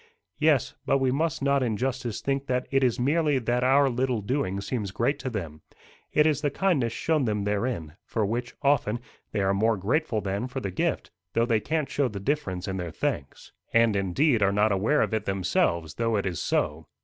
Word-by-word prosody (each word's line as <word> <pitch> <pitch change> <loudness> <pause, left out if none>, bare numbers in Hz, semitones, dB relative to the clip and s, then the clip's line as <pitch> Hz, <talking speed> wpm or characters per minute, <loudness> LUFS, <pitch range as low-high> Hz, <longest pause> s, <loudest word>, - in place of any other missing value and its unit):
"Yes; 150 -5 +3
but 135 - +2
we 135 -1 +1
must 155 +1 -1
not 140 0 +3
in 115 -4 0
justice 125 -2 -2
think 140 0 -1
that 125 0 0
it 135 0 +3
is 125 -2 +2
merely 145 +2 +2
that 120 0 0
our 135 +2 +5
little 125 -2 0
doing 100 -5 -1
seems 100 +1 -3
great 125 +9 0
to 130 - -3
them: 85 -10 -5 0.5
it 150 - +4
is 155 -2 +2
the 145 - +1
kindness 140 -8 +1
shown 155 +2 0
them 105 -2 -1
therein, 105 -6 -2
for 110 -2 -1
which, 120 +4 -3
often, 130 -5 +2 0.3
they 105 - -1
are 95 0 +2
more 110 +2 +2
grateful 115 - 0
than 100 +4 -2
for 130 +1 -4
the 100 -7 -4
gift, 90 - -1 0.2
though 115 +1 +3
they 115 -2 +2
can't 155 +5 -1
show 140 -2 +1
the 105 -4 -6
difference 100 -6 -2
in 95 -1 -2
their 90 -2 -3
thanks." 70 -3 -4 0.2
"And, 115 -2 +4
indeed, 105 - +2
are 100 -1 +4
not 105 +2 +2
aware 105 +10 +2
of - - -3
it 110 -1 -1
themselves, 85 -4 0
though 115 +2 0
it 100 - 0
is 90 -3 -2
so. 75 +1 -1
120 Hz, 210 wpm, -26 LUFS, 100-135 Hz, 0.5 s, our